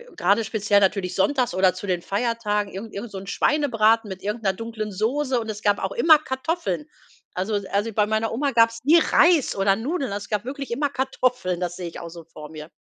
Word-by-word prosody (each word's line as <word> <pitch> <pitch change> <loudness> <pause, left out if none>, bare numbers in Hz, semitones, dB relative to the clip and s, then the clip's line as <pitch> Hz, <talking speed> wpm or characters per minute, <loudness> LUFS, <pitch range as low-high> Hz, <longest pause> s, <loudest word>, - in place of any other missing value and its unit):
grade 200 +5 +2
speziell 210 -2 +2
natürlich 190 -2 0
sonntags 250 +5 +1
oder 185 -1 +3
zu 185 +2 -8
den 180 -2 0
Feiertagen 210 -2 -1
irgend 210 +4 -8
irgend 210 +3 -6
so 195 - -7
'n 190 - -8
Schweinebraten 225 -6 +2
mit 190 -1 -7
irgend 210 +2 -3
'ner 195 -1 +2
dunklen 220 0 -5
Soße. 250 +6 0
Und 225 -1 -6
es 210 0 -5
gab 205 0 +2
auch 190 - -1
immer 310 +4 +6
Kartoffeln. 305 +3 -3 0.5
Also 190 +4 -2
es 200 -1 -2
also 205 +4 -1
bei 210 0 +2
meiner 220 +1 -1
Oma 275 +4 -1
gab's 230 -1 +3
nie 330 +3 +7
Reis 335 -3 +3
oder 195 0 +2
Nudeln. 270 - -3
Also, 205 0 -4
es - - -19
gab 210 +1 -2
wirklich 275 +1 -6
immer 285 +4 0
Kartoffeln. 255 -8 -1
Das 175 -1 -3
sehe 180 -2 -6
ich 165 - -8
auch 170 - -8
so 165 0 -11
vor 155 -2 -12
mir. 155 0 -9
215 Hz, 225 wpm, -23 LUFS, 195-250 Hz, 0.5 s, nie